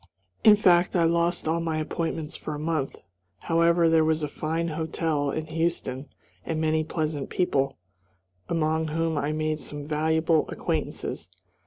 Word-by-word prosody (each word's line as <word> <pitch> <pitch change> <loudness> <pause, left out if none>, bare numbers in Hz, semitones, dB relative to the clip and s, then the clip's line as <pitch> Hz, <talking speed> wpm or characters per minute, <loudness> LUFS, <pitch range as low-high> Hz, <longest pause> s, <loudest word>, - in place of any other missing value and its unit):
In 215 - +9
fact 180 -3 +4
I 170 - +4
lost 170 +1 +1
all 165 +1 +1
my 165 -1 -1
appointments 160 0 -3
for 155 - -5
a - - -6
month. 155 -3 -1 0.5
However, 170 0 +3
there 160 -1 +4
was 160 0 +1
a - - 0
fine 160 +3 -2
hotel 160 -2 -1
in 155 +2 -2
Houston 155 -4 -2 0.3
and 160 -1 -2
many 155 0 +1
pleasant 155 -3 -3
people, 135 -7 0 0.7
among 160 -1 +1
whom 165 +1 -1
I 145 +1 0
made 155 0 -1
some 145 0 -6
valuable 160 +1 +1
acquaintances. - - -3
160 Hz, 150 wpm, -26 LUFS, 155-165 Hz, 0.7 s, In